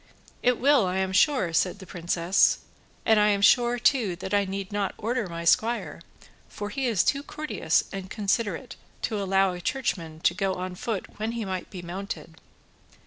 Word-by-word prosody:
"It 250 -1 +3
will, 275 -6 +4
I 180 +1 -1
am 190 0 0
sure," 205 - +3
said 180 +3 +1
the 195 - -11
princess, 175 0 +2 0.5
"and 220 -1 +5
I 210 - +5
am 200 -1 +2
sure, 240 +2 +5
too, 235 -6 +2
that 190 +2 -6
I 200 -1 +3
need 195 0 -5
not 205 -1 -1
order 235 -1 -1
my 170 0 -5
squire, 230 +7 +1 0.5
for 205 0 -6
he 270 +1 -1
is 215 -7 +2
too 280 - +1
courteous 305 +1 0
and 190 -1 -6
considerate 210 +1 -2 0.3
to 215 -3 -1
allow 195 -1 +2
a 180 - -7
Churchman 170 - -2
to 175 - +3
go 195 0 -1
on 185 0 -4
foot 200 +1 -3
when 220 +2 -2
he 230 -2 -3
might 185 -1 -4
be 180 -3 -8
mounted." 190 +4 -6
200 Hz, 185 wpm, -26 LUFS, 185-230 Hz, 0.5 s, and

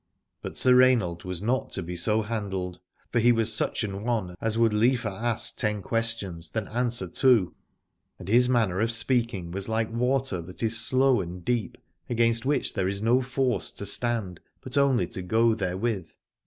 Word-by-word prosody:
But - - -7
Sir 125 - +5
Rainald 120 -10 +3
was 90 +1 -4
not 125 +4 0
to 95 - 0
be 90 +1 -6
so 110 +5 +1
handled: 95 -5 -4 0.3
for 120 - +2
he 120 +2 +5
was 115 -2 +1
such 110 - -1
an 100 -1 -4
one 110 -7 -1
as 115 0 -1
would 115 -2 +3
liever 115 +1 +2
ask 110 +3 -2
ten 105 -3 -1
questions 110 -8 -1
than 110 -3 -3
answer 120 -4 -1
two, 115 -1 +3 0.6
and - - -11
his 120 +4 +4
manner 110 -7 +1
of 115 +1 +1
speaking 115 -6 -1
was 95 +3 -3
like 110 0 -1
water 125 -5 0
that 90 +6 -8
is 115 0 +2
slow 130 +1 +3
and 90 0 -8
deep, 120 -4 -1 0.3
against 115 +1 +1
which 140 -2 0
there 95 -3 -1
is 100 +2 -2
no 120 +3 +3
force 130 -1 -1
to 100 - -6
stand, 105 -4 -1 0.2
but 130 +1 -7
only 140 -3 +3
to 95 - -7
go 115 +5 +2
therewith. 95 -2 -2
115 Hz, 180 wpm, -26 LUFS, 95-120 Hz, 0.6 s, Sir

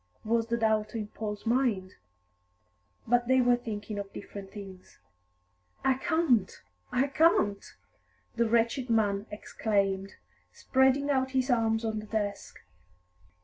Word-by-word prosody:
was 230 +1 +1
the 235 0 0
doubt 220 0 0
in 210 -2 -4
Paul's 210 -1 -6
mind. 225 -6 +1 1.1
But 240 0 +2
they 260 0 +4
were 245 -1 +4
thinking 210 -3 -5
of 200 -1 -6
different 200 -1 -9
things. 195 -3 -11 0.9
"I 265 - +5
can't, 260 - +1 0.3
I 255 +2 +2
can't!" 275 -9 +2 0.7
the 235 -1 +1
wretched 235 +3 +1
man 210 -2 +1
exclaimed, 195 -2 -1 0.4
spreading 265 - +2
out 265 -1 0
his 260 +1 +1
arms 225 -1 +1
on 220 -1 -1
the 215 - -9
desk. 205 -2 -4
225 Hz, 125 wpm, -29 LUFS, 205-250 Hz, 1.1 s, I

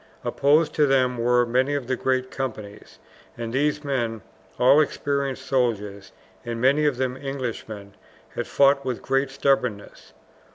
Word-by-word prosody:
Opposed 150 +3 +2
to 150 -1 +3
them 130 -2 +2
were 120 +1 +3
many 130 +4 +1
of 140 -3 -3
the 130 +1 -1
great 130 0 -1
companies, 110 -6 -7 0.4
and 115 -1 -5
these 150 +2 0
men, 120 -6 -2 0.3
all 135 +5 +6
experienced 140 -3 -2
soldiers 105 -7 -1 0.3
and 115 -1 -5
many 140 +5 +3
of 140 -4 0
them 130 -1 -1
Englishmen, 120 -7 -6 0.4
had - - -5
fought 140 0 +3
with 125 -3 -4
great 135 +1 0
stubbornness. 135 -6 -2
130 Hz, 140 wpm, -24 LUFS, 120-140 Hz, 0.4 s, all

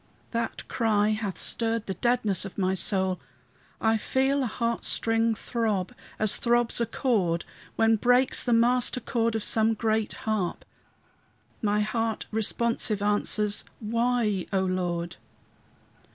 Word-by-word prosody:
That 230 -1 -3
cry 215 -3 +1
hath 215 -3 -2
stirred 230 -1 0
the 190 - -3
deadness 230 -4 +1
of 195 - -9
my 190 -1 +1
soul; 190 0 0 0.6
I 225 0 +2
feel 265 +5 +1
a 255 - 0
heart 235 +1 -2
string 225 0 +1
throb, 215 -5 -2 0.2
as 215 -2 +3
throbs 240 0 +2
a 235 - +1
chord 195 -9 0 0.3
When 225 0 +3
breaks 250 +3 +3
the 245 - -1
master 245 +2 +3
chord 230 -1 -1
of 220 - -1
some 220 0 +3
great 220 0 0
harp; 215 -5 -2 1.0
My 210 -1 +1
heart 225 +1 -2
responsive 220 -1 0
answers, 210 0 0 0.2
"Why?" 230 -3 0
O 190 -2 +1
Lord. 175 -2 -2
220 Hz, 130 wpm, -27 LUFS, 205-235 Hz, 1.0 s, as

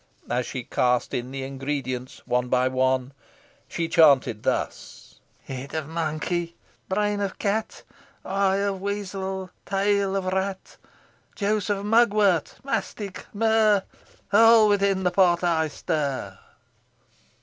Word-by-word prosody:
As 125 0 0
she 125 - -5
cast 125 0 0
in 125 +1 -3
the 135 0 -5
ingredients 135 -2 -4
one 125 0 0
by 125 +1 +2
one, 130 0 0 0.5
she 165 -1 -3
chanted 140 -10 +4
thus: - - -4 0.2
"Head 135 +3 -7
of 155 -2 -3
monkey, 165 +1 -2 0.3
brain 205 +1 0
of 195 -2 -3
cat, 215 +1 -2 0.4
Eye 195 0 +1
of 200 -1 -1
weasel, 195 -2 -4
tail 200 0 +1
of 195 -1 -1
rat, 190 +1 -3 0.6
Juice 210 -1 -1
of 200 -1 -1
mugwort, 210 -6 +3
mastic, 210 -7 -4
myrrh 215 -2 +3 0.5
All 225 0 +7
within 200 -2 +2
the 180 - +2
pot 180 -2 +3
I 165 -2 +2
stir." 140 -10 -3
185 Hz, 120 wpm, -25 LUFS, 135-200 Hz, 0.6 s, All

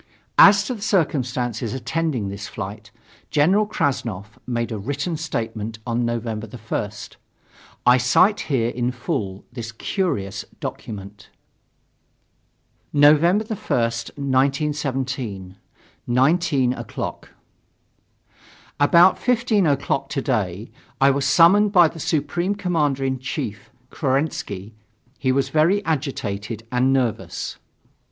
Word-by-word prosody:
As 200 0 +8
to 255 - -3
the 220 - -9
circumstances 125 - 0
attending 135 -6 -2
this 100 +1 -6
flight, 105 0 -7 0.4
General 185 +8 +3
Krassnov 115 - -2
made 120 -1 -2
a 110 - -3
written 145 - -3
statement 115 -8 -4
on 120 0 -1
November 115 -2 -3
1st. 105 -2 -5 0.7
I 125 +1 +7
cite 180 +12 +4
here 120 -5 +1
in 120 +1 -1
full 120 - -4
this 115 -2 -6
curious 110 - -2 0.2
document. 100 -1 -7 1.6
November 155 +8 +5
1st, 115 - -2
1917, 135 - -1 0.5
19 135 0 +2
o'clock. - - -6 1.5
About 170 +6 +6
15 235 -6 +2
o'clock 140 -1 0
today, 110 - -2 0.3
I 135 +1 +5
was 140 0 0
summoned 200 +5 +5
by 175 -4 +6
the 165 - -9
Supreme 165 +6 -1
Commander 150 -8 0
in 130 -1 -1
Chief, 115 -5 -5 0.2
Kerensky. 130 - -2 0.5
He 130 - +1
was 135 +1 +1
very 175 +7 +2
agitated 115 -8 -3
and 125 +2 +2
nervous. 130 -5 -2
130 Hz, 105 wpm, -22 LUFS, 115-160 Hz, 1.6 s, As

